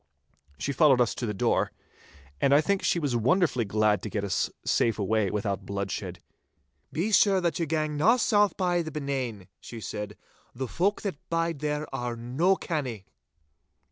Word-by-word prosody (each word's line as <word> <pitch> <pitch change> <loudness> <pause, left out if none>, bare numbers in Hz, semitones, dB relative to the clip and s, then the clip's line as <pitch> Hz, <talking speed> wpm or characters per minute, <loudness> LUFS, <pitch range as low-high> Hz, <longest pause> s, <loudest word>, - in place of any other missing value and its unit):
She 140 - -2
followed 140 -4 +5
us 120 -2 +2
to 120 - -4
the - - -1
door, - - +1 0.7
and 140 - +5
I 145 - +6
think 200 +4 0
she - - +1
was 145 -7 -1
wonderfully 130 - +2
glad 105 -1 +2
to 105 - -5
get 105 0 -2
us 95 -4 0 0.2
safe 115 - +2
away 105 0 +1
without 100 -1 -2
bloodshed. 100 -1 -4 0.7
'Be 185 +7 -1
sure 195 -1 +5
that 170 -3 -1
ye 165 - 0
gang 155 -1 -1
na 215 +11 +5
south 205 -3 +3
by 180 -2 +1
the 160 - -5
Benane,' 135 -10 -4
she 115 - -9
said, 105 0 -6 0.4
'the 130 +1 -3
folk 195 - 0
that 190 -9 -5
bide 165 -2 0
there 150 0 -2
are 120 -3 -3
no 130 +11 +1
canny. 130 - -4
140 Hz, 170 wpm, -27 LUFS, 110-170 Hz, 0.7 s, I